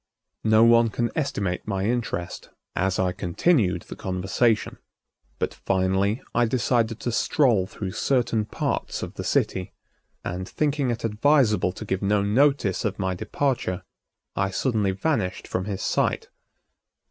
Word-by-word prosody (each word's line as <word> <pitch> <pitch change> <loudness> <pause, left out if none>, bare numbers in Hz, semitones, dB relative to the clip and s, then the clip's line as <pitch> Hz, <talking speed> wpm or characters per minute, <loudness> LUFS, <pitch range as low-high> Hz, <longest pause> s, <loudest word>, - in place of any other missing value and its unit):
No 110 0 +5
one 115 0 +6
can 120 +2 -1
estimate 100 - -2
my 95 -2 -1
interest 110 -6 -3 0.3
as 95 +1 0
I 95 -1 +1
continued 90 - +1
the - - -9
conversation. 95 +5 0 0.6
But - - -2
finally 95 +4 0
I 120 +1 +3
decided 115 -1 +1
to 120 - -1
stroll 115 -6 +2
through 95 -1 -5
certain 115 -2 +1
parts - - -3
of - - -6
the - - -6
city 90 -1 0 0.5
and, 90 +1 -4
thinking 145 -3 0
it 120 -1 -2
advisable 110 -4 +3
to 110 - -8
give 95 -2 -2
no 100 0 +2
notice 120 -2 +2
of 105 -2 -1
my 95 -2 -1
departure, 110 -1 -2 0.5
I 95 0 +1
suddenly 105 0 0
vanished 95 -1 -1
from 90 - -2
his 100 -2 -4
sight. - - 0
105 Hz, 140 wpm, -25 LUFS, 95-120 Hz, 0.6 s, one